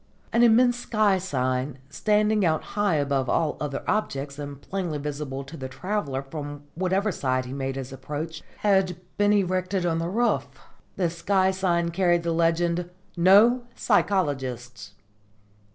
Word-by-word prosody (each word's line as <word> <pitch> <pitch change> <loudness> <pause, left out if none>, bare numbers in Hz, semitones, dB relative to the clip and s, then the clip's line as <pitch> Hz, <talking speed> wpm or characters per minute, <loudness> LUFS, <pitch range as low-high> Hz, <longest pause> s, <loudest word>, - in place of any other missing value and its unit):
An 235 - +4
immense 240 +1 +5
sky 215 -5 +2
sign, 130 -5 -1
standing 210 +3 +2
out 160 -3 +1
high 205 -5 +2
above 140 -3 0
all 160 -2 +1
other 140 -2 -3
objects 140 -9 -2
and 145 -1 -6
plainly 175 -1 -3
visible 140 -2 -4
to 135 +4 -10
the 130 -3 -6
traveller 140 -2 -3
from 145 0 -7
whatever 190 +4 0
side 130 -5 -1
he 125 - -7
made 135 -1 -3
his 135 0 -6
approach, 150 +4 -5 0.2
had 190 -4 +2 0.2
been 205 0 +3
erected 185 -2 +1
on 165 -1 +1
the 165 +1 -2
roof. 205 - +1 0.5
The 175 -4 0
sky 190 +3 +2
sign 175 -3 0
carried 175 -1 +2
the 170 - 0
legend 170 +1 +1 0.3
"No 210 +8 +5
Psychologists!" 130 - -1
170 Hz, 145 wpm, -25 LUFS, 140-195 Hz, 0.5 s, immense